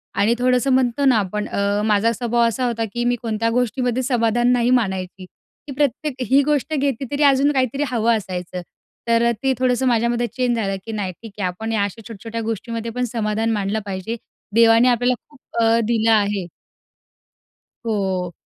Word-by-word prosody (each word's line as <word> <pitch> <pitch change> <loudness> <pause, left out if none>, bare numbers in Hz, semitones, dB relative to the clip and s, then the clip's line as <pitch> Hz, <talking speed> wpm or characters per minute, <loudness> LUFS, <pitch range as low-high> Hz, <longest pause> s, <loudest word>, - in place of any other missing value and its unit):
आणि 210 +4 +3
थोडंसं 250 +2 +2
म्हणतो 260 +2 +2
ना, 255 -4 +5
आपण 210 +1 -2
अ, 200 +1 0
माझा 215 +2 +3
स्वभाव 235 0 +1
असा 250 +3 -1
होता 230 -2 -1
की, 240 - -1
मी 245 - +2
कोणत्या 230 0 -1
गोष्टीमध्ये 250 +1 -1
समाधान 240 -1 +2
नाही 245 -1 +2
मानायची, 190 -2 -5 0.4
की - - -6
प्रत्येक 290 0 0
ही 270 +2 +5
गोष्ट 300 +1 0
घेतली 275 -2 -1
तरी 290 +1 0
अजून 280 +1 +4
काहीतरी 270 +1 0
हवं 235 -1 +2
असायचं. 180 -2 -5 0.5
तर, 235 0 +3
ते 265 - +3
थोडंसं 255 0 +1
माझ्यामध्ये 235 0 +1
चेंज 245 +1 -1
झालं 195 -3 -1
की, 225 - -5
नाही 205 -4 -3
ठीक 225 -2 -10
आहे. 185 - 0
आपण 220 +6 -4
या 210 -2 +1
अशा 205 +3 -4
छोट्या-छोट्या 225 +1 -7
गोष्टीमध्ये 230 +1 -4
पण 250 +2 -2
समाधान 220 0 0
मानलं 205 0 -1
पाहिजे. 195 +3 -4 0.4
देवाने 230 +1 +6
आपल्याला 245 +1 +2
खूप 290 -3 -20 0.2
अ, 225 +1 +4
दिलं 225 -1 +2
आहे. 205 -3 +2 1.4
हो. 190 -5 -1
230 Hz, 170 wpm, -21 LUFS, 210-250 Hz, 1.4 s, देवाने